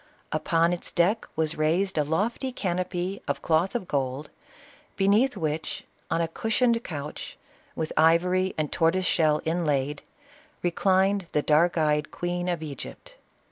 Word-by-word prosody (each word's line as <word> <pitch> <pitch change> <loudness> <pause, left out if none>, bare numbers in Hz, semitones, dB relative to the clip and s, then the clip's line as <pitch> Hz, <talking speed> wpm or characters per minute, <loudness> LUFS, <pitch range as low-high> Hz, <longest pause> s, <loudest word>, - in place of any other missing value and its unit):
Upon 170 0 +2
its 175 - -5
deck 190 +6 +1
was 155 -1 -1
raised 175 +5 +1
a 150 - +2
lofty 210 - -1
canopy 185 -2 -2
of - - -2
cloth 170 +6 +1
of 225 -7 -2
gold, 135 +1 -2 0.6
be 195 - +1
neath 220 +4 +3
which, 155 -2 -3 0.3
on 165 - +1
a 165 - +1
cushioned 230 +6 +1
couch, 150 -3 -6 0.4
with 160 -1 -3
ivory 180 +4 +3
and 155 -2 -1
tortoise 170 +3 +2
shell 155 -3 +2
inlaid, 150 -4 0 0.6
reclined 190 +2 +2
the 150 - +2
dark 165 +4 +3
eyed 150 -1 +1
queen 175 0 -3
of 170 -3 -2
Egypt. 155 - -8
170 Hz, 140 wpm, -26 LUFS, 155-190 Hz, 0.6 s, neath